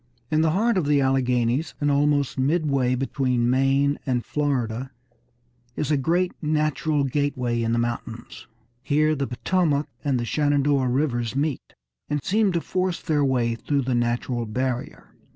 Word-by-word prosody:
In 155 Hz, 0 st, +3 dB
the 160 Hz, -, +3 dB
heart 205 Hz, +5 st, +2 dB
of 155 Hz, -, -2 dB
the 145 Hz, -1 st, +3 dB
Alleghanies, 130 Hz, +1 st, +1 dB
and 145 Hz, -1 st, +1 dB
almost 145 Hz, -1 st, +2 dB
midway 140 Hz, -3 st, +1 dB
between 125 Hz, -2 st, 0 dB
Maine 135 Hz, +2 st, +2 dB
and 125 Hz, -3 st, -1 dB
Florida, 130 Hz, -4 st, -1 dB, 0.9 s
is 150 Hz, -, -2 dB
a -, -, +4 dB
great 170 Hz, +6 st, +1 dB
natural 155 Hz, -1 st, 0 dB
gateway 130 Hz, -4 st, -1 dB
in 115 Hz, 0 st, 0 dB
the 115 Hz, -, +1 dB
mountains. 120 Hz, -1 st, -4 dB, 0.3 s
Here 155 Hz, +3 st, +2 dB
the 140 Hz, -2 st, -2 dB
Potomac 150 Hz, +2 st, 0 dB, 0.2 s
and 135 Hz, -4 st, +1 dB
the 120 Hz, -, -2 dB
Shenandoah 145 Hz, -1 st, +1 dB
Rivers 125 Hz, -3 st, -1 dB
meet, 145 Hz, -1 st, -2 dB, 0.3 s
and 145 Hz, 0 st, 0 dB
seem 210 Hz, 0 st, +2 dB
to 170 Hz, -, 0 dB
force 185 Hz, 0 st, -1 dB
their 150 Hz, -2 st, 0 dB
way 125 Hz, -4 st, +1 dB
through 140 Hz, +4 st, -1 dB
the 130 Hz, 0 st, -1 dB
natural 120 Hz, 0 st, -1 dB
barrier. 125 Hz, +2 st, -4 dB
140 Hz, 150 wpm, -24 LUFS, 125-150 Hz, 0.9 s, a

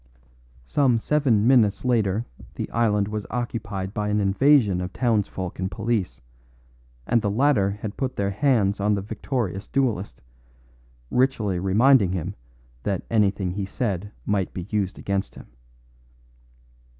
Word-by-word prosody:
Some 130 Hz, -, +2 dB
seven 120 Hz, -4 st, +2 dB
minutes 115 Hz, -4 st, +3 dB
later 110 Hz, -3 st, +1 dB, 0.3 s
the -, -, -3 dB
island 105 Hz, -4 st, +1 dB
was 105 Hz, -1 st, -4 dB
occupied 105 Hz, -5 st, -4 dB
by 105 Hz, -2 st, -2 dB
an 105 Hz, 0 st, +1 dB
invasion 105 Hz, -1 st, +3 dB
of 90 Hz, 0 st, -4 dB
townsfolk 105 Hz, -7 st, -1 dB
and 95 Hz, 0 st, -1 dB
police, 110 Hz, -, -2 dB, 0.8 s
and 120 Hz, -, +2 dB
the 105 Hz, -, 0 dB
latter 110 Hz, -2 st, +2 dB
had 105 Hz, +1 st, -6 dB
put 130 Hz, -2 st, -2 dB
their 100 Hz, 0 st, -1 dB
hands 105 Hz, -4 st, +2 dB
on 105 Hz, +1 st, +2 dB
the 100 Hz, -, -3 dB
victorious 105 Hz, -2 st, -3 dB
duellist, 105 Hz, -, -1 dB, 0.9 s
ritually 115 Hz, -8 st, +1 dB
reminding 100 Hz, +2 st, +4 dB
him 90 Hz, +1 st, -3 dB, 0.5 s
that 95 Hz, +6 st, -2 dB
anything 100 Hz, -4 st, +1 dB
he 100 Hz, +1 st, -3 dB
said 100 Hz, -2 st, -3 dB
might 100 Hz, -3 st, 0 dB
be 90 Hz, -, -4 dB
used 100 Hz, -3 st, -1 dB
against 100 Hz, -1 st, -3 dB
him. -, -, -11 dB
105 Hz, 135 wpm, -24 LUFS, 95-120 Hz, 0.9 s, reminding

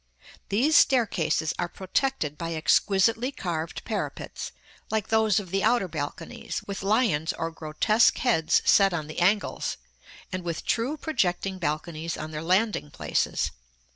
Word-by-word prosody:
These 265 Hz, +10 st, +2 dB
staircases 185 Hz, -, +3 dB
are 175 Hz, -, -1 dB
protected 190 Hz, -, -1 dB
by 165 Hz, +1 st, -4 dB
exquisitely 210 Hz, -, +2 dB
carved 170 Hz, -, -4 dB
parapets, -, -, -4 dB, 0.4 s
like 220 Hz, -2 st, -1 dB
those 220 Hz, -3 st, +3 dB
of 185 Hz, -4 st, -9 dB
the 195 Hz, 0 st, 0 dB
outer 225 Hz, -3 st, +3 dB
balconies, 160 Hz, 0 st, -5 dB
with 200 Hz, -1 st, -5 dB
lions 195 Hz, -7 st, +1 dB
or 165 Hz, 0 st, -3 dB
grotesque 165 Hz, +9 st, +2 dB
heads 190 Hz, -11 st, +2 dB
set 195 Hz, -3 st, +5 dB
on 155 Hz, -3 st, -3 dB
the 155 Hz, +2 st, -6 dB
angles, 200 Hz, +4 st, +1 dB, 0.5 s
and 185 Hz, 0 st, -4 dB
with 170 Hz, -2 st, -4 dB
true 250 Hz, +7 st, 0 dB
projecting 190 Hz, -, -1 dB
balconies 160 Hz, 0 st, -3 dB
on 155 Hz, 0 st, -6 dB
their 150 Hz, -1 st, -4 dB
landing 185 Hz, 0 st, +1 dB
places. -, -, -1 dB
185 Hz, 140 wpm, -26 LUFS, 160-220 Hz, 0.5 s, set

